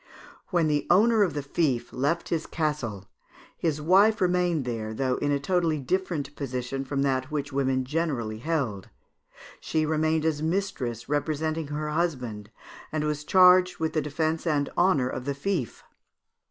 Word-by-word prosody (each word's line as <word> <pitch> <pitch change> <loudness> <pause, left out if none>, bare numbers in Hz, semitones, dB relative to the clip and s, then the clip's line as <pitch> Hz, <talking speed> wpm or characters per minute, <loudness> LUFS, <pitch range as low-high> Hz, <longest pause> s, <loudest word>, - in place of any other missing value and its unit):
"When 175 -3 +2
the 150 -1 0
owner 220 +5 +5
of 185 -7 +2
the 145 - -2
fief 135 -5 -1
left 145 +6 -1
his 165 -2 -1
castle, 140 - -2 0.5
his 155 -3 -1
wife 195 +7 +4
remained 180 -5 +1
there, 110 -2 -4
though 130 +1 0
in 145 - 0
a 140 - +1
totally 165 +1 +1
different 145 -1 -2
position 130 0 -3
from 135 0 -1
that 130 -1 0
which 145 -2 -3
women 130 -1 +1
generally 130 -8 -2
held. 125 - -2 0.7
She 155 -1 0
remained 155 0 +1
as 155 -2 0
mistress, 155 - -2
representing 155 +2 -1
her 150 +1 -3
husband, 125 -11 -2 0.4
and 155 -1 -1
was 150 -1 -2
charged 180 +1 +5
with 160 -1 -2
the 155 - +1
defence 155 +3 -2
and 145 -3 +1
honour 175 -8 +3
of 130 0 -5
the 140 0 -2
fief. 145 - -3
150 Hz, 155 wpm, -26 LUFS, 135-165 Hz, 0.7 s, owner